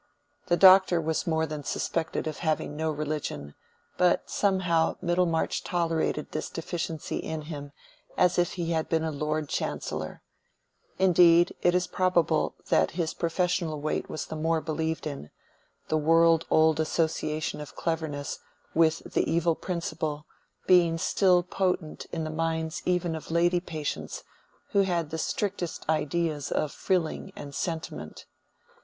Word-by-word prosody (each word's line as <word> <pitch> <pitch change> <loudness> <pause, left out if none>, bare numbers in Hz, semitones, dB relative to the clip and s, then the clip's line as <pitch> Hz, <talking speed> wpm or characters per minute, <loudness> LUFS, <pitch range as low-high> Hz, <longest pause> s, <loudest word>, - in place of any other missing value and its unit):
The 175 - +3
Doctor 190 -2 +7
was 160 +1 -1
more 160 -1 +1
than 150 -1 -6
suspected 165 +4 -2
of 155 -1 -4
having 155 -2 -1
no 160 +1 -1
religion, 150 - -4 0.4
but 180 -1 +2
somehow 180 -5 +2
Middlemarch 175 -2 0
tolerated 165 -3 -1
this - - -3
deficiency 165 -2 -4
in 160 -1 -4
him 145 -2 -7 0.5
as 180 -1 +3
if 175 - +1
he 170 -2 -2
had 160 -1 -1
been 160 -1 +1
a 160 - -1
Lord 150 +1 -2
Chancellor; 75 - -4 0.7
indeed 175 -2 +5
it 175 0 +3
is 180 0 +2
probable 180 -3 +1
that 80 0 +4
his 165 -3 0
professional 170 -2 -1
weight 155 +1 -2
was 155 - -4
the - - -6
more 160 +1 +1
believed 160 0 -2
in, 140 - -6 0.6
the 155 - +1
world 165 +1 +4
old 160 -1 +4
association 155 -1 -1
of 150 - -10
cleverness 160 -4 -3 0.3
with 160 -1 +3
the - - +1
evil 170 0 +2
principle 160 -3 -4 0.4
being 170 -3 +5
still 180 +1 +3
potent 180 -3 -2
in 160 - -3
the 155 - -3
minds 160 0 -2
even 180 -2 +1
of 160 - -7
lady 175 +2 +3
patients 155 -4 -5 0.5
who 200 - +4
had 170 -5 0
the 160 - -3
strictest 190 -3 -3
ideas 155 0 -1
of 150 -2 0
frilling 180 -5 -1
and 140 -1 -8
sentiment. 165 +1 -5
160 Hz, 140 wpm, -27 LUFS, 155-175 Hz, 0.7 s, Doctor